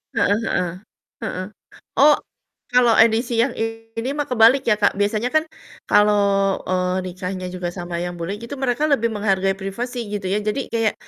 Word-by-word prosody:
Heeh 205 Hz, -, +3 dB, 0.2 s
heeh. 180 Hz, -1 st, 0 dB, 0.5 s
Heeh. 185 Hz, +1 st, -4 dB, 0.5 s
Oh, 295 Hz, +1 st, +7 dB, 0.6 s
kalo 250 Hz, -1 st, +5 dB
edisi 230 Hz, +1 st, +3 dB
yang 245 Hz, +1 st, 0 dB
ini 225 Hz, +1 st, -4 dB
mah 295 Hz, -, 0 dB
kebalik 250 Hz, +2 st, +5 dB
ya 235 Hz, -, +4 dB
Kak, 205 Hz, -, +4 dB
biasanya 210 Hz, +4 st, 0 dB
kan 310 Hz, 0 st, +3 dB, 0.4 s
kalo, 210 Hz, 0 st, +5 dB, 0.6 s
eee, 185 Hz, 0 st, 0 dB
nikahnya 185 Hz, +1 st, -5 dB
juga 180 Hz, -1 st, -3 dB
sama 175 Hz, -1 st, -5 dB
yang 175 Hz, 0 st, -4 dB
bule 170 Hz, +4 st, -3 dB
gitu, 235 Hz, +4 st, -6 dB
mereka 265 Hz, +2 st, 0 dB
lebih 235 Hz, -5 st, +2 dB
menghargai 195 Hz, -2 st, +1 dB
privasi 230 Hz, +4 st, -5 dB
gitu 205 Hz, -2 st, -4 dB
ya. 210 Hz, -, +1 dB
Jadi 215 Hz, +6 st, -2 dB
kayak, 225 Hz, -2 st, +1 dB
220 Hz, 160 wpm, -21 LUFS, 190-240 Hz, 0.6 s, Oh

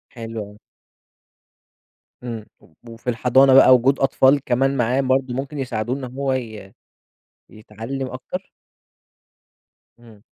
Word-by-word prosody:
حلو 115 Hz, -1 st, -6 dB
أوي. 105 Hz, +1 st, -16 dB, 1.6 s
إمم، 115 Hz, -3 st, -6 dB
و 80 Hz, -, -24 dB, 0.2 s
وفي 115 Hz, +2 st, -6 dB
الحضانة 130 Hz, +3 st, +4 dB
بقى 130 Hz, -1 st, +8 dB
وجود 130 Hz, +3 st, +2 dB
أطفال 135 Hz, +1 st, +3 dB
كمان 135 Hz, +2 st, 0 dB
معاه 125 Hz, +2 st, +1 dB
برضه 130 Hz, -1 st, 0 dB
ممكن 135 Hz, +3 st, -5 dB
يساعدوه 120 Hz, -2 st, -3 dB
إن 140 Hz, -, -7 dB
هو 135 Hz, -1 st, -1 dB
ي 110 Hz, -6 st, -6 dB, 0.8 s
يتعلّم 115 Hz, +5 st, -7 dB
أكتر؟ 130 Hz, +9 st, -8 dB, 1.5 s
إمم. 115 Hz, -3 st, -18 dB
125 Hz, 115 wpm, -21 LUFS, 115-135 Hz, 1.6 s, بقى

